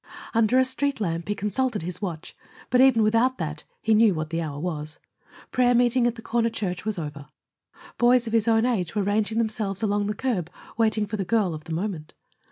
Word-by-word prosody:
Under 230 +1 +3
a 260 - +5
street 275 +1 -1
lamp 170 -5 -2
he 205 - -1
consulted 210 +1 -1
his 180 +2 -4
watch, 175 -5 -5 0.4
but 250 0 +5
even 260 -4 +5
without 230 +4 +2
that 150 -3 -5 0.2
he 220 - +3
knew 215 -3 +5
what 155 0 -4
the 165 0 -1
hour 145 -3 -5
was. 155 -2 -4 0.5
Prayer 245 -1 +3
meeting 240 0 +3
at 240 - -1
the 230 - -11
corner 230 0 +1
church 195 -5 -4
was 215 -2 -2
over; 150 -3 -6 0.7
boys 245 0 +4
of 225 - -5
his 225 -1 +2
own 225 0 +4
age 205 -9 -1
were 205 - +1
ranging 210 +2 0
themselves 215 -3 -1
along 205 -1 +1
the 210 - -2
curb, 215 -11 -2 0.3
waiting 220 -2 +2
for 210 +1 -4
the 195 - -1
girl 200 -2 +1
of 155 0 -8
the 165 - -5
moment. 170 -3 -4
215 Hz, 210 wpm, -25 LUFS, 175-230 Hz, 0.7 s, a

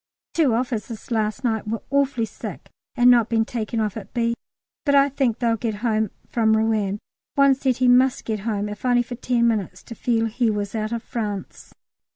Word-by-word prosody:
Two 290 -9 +3
officers 230 -2 -3
last 220 +2 -1
night 220 -3 -1
were 225 +1 -3
awfully 275 -4 +2
sick 210 - -9 0.2
at 245 -2 +4
not 240 -2 +6
being 225 -1 +2
taken 230 -1 -3
off 210 -3 -1
at 210 0 -9
B., 235 -1 +1 0.5
but 280 -2 +3
I 280 0 +5
think 265 -5 0
they'll 230 -2 +1
get 220 -1 -2
home 220 -2 +1 0.2
from 220 -2 +2
Rouen. 215 -3 +1 0.4
One 275 -1 +6
said 260 -2 0
he 255 - +2
must 250 +1 +4
get 215 -2 -2
home, 210 0 -2
if 210 0 -8
only 245 -1 +3
for 240 - -8
ten 240 -1 +1
minutes, 200 -5 -1
to - - -9
feel 230 0 0
he 225 +1 0
was 205 -1 -2
out 215 -1 -2
of 235 0 -3
France. 210 -4 -5
230 Hz, 195 wpm, -23 LUFS, 215-245 Hz, 0.5 s, not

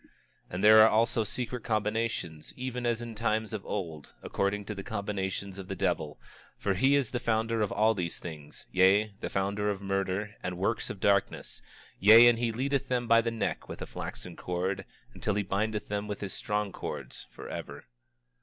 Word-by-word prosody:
26:22 - - -26 0.4
And 90 +3 -4
there 110 +1 +9
are 110 - +8
also 115 +1 +2
secret 120 +2 -4
combinations, 105 -7 -2
even 125 -1 -3
as 120 0 0
in 115 -1 -6
times 110 0 -1
of 105 -3 -4
old, 80 -7 -5
according 100 +1 -1
to 105 - -4
the 100 - -6
combinations 100 -2 -3
of 95 - -7
the 95 - -4
devil, 75 - -1 0.4
for 100 - 0
he 135 +9 +4
is 135 -5 +1
the 125 - -1
founder 115 -1 0
of 105 - 0
all 110 +1 +3
these 90 -5 -3
things; 75 -3 -9
yea, 100 +3 +4
the - - -4
founder 100 +2 0
of 100 -2 -2
murder, 95 +1 -2
and 90 -1 -4
works 100 +5 -1
of 100 - -6
darkness; 100 0 +1 0.4
yea, 110 +4 +9
and 120 -1 +4
he 120 -1 +1
leadeth 135 +4 -1
them 125 -1 0
by 115 0 +6
the 115 - -1
neck 115 -1 -3
with - - -7
a - - -4
flaxen 90 -2 -7
cord, 95 +2 -2 0.3
until 105 - -1
he 105 - +1
bindeth 105 +2 -1
them 105 0 -2
with 105 -1 -5
his 100 -2 -4
strong 105 -1 -1
cords - - -6
forever. - - -8
105 Hz, 190 wpm, -29 LUFS, 95-115 Hz, 0.4 s, there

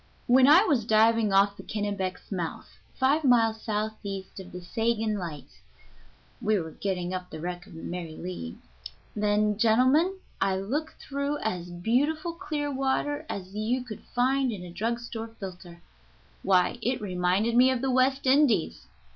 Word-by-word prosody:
When 255 +2 +6
I 320 +7 +8
was 290 - +2
diving 220 0 +4
off 200 +1 +4
the - - -10
Kennebec's 205 -3 -4
mouth, 175 -4 -5 0.2
five 280 +4 +2
miles 225 -4 +3
southeast 210 -3 -4
of 185 -1 -10
the 180 - -7
Seguin 225 +4 -1
light 160 -5 -8 0.8
(we 215 -1 +2
were 160 -2 -5
getting 180 0 -3
up 180 -1 -5
the 160 - -8
wreck 175 +2 -5
of - - -13
the 165 - -9
Mary 170 -3 -5
Lee), 165 - -6 0.6
then, 210 0 +1
gentlemen, 255 - +4 0.3
I 195 0 +2
looked 285 +12 -3
through 280 +1 -2
as 180 -5 -2
beautiful 280 - 0
clear 305 -5 -3
water 280 +3 -1
as 190 -1 -6
you 225 +5 -1
could 225 -4 -8
find 260 +1 +1
in 195 -5 -6
a 175 - -9
drug 230 +6 -1
store 230 -1 -6
filter. 180 -3 -9 0.6
Why, 185 +4 +2
it 250 +2 0
reminded 190 +3 0
me 250 +2 +6
of 260 -2 0
the 265 -1 0
West 265 +2 +2
Indies. 270 -2 +2
220 Hz, 160 wpm, -27 LUFS, 185-260 Hz, 0.8 s, I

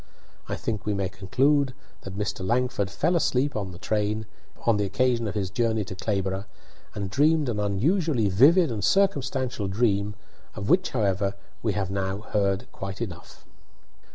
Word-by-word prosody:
I - - -1
think 105 -3 -3
we 105 - +1
may 100 -2 -1
conclude 130 - +1 0.3
that 95 0 -8
Mr. 105 -2 -2
Langford 120 -2 0
fell 160 - +1
asleep 140 -3 +1
in 100 -3 -2
the 90 - -9
train 105 +2 -1 0.4
on 115 -3 +4
the 105 - +1
occasion 115 +3 +1
of 105 - -4
his 95 -3 -2
journey 110 -1 +1
to 95 - -7
Clayborough, 95 0 -2 0.5
and 100 -2 -2
dreamed 150 +4 +3
an 110 -4 -1
unusually 120 - +1
vivid 140 - +5
and 110 -3 -3
circumstantial 135 - +1
dream, 100 0 +1 0.4
of 100 +3 -2
which, 185 +1 +4
however, 100 -4 0 0.3
we 110 -3 0
have 100 -2 -2
now 95 0 -2
heard 100 -2 0
quite 95 0 -6
enough." 90 -8 -7
105 Hz, 160 wpm, -26 LUFS, 100-130 Hz, 0.5 s, vivid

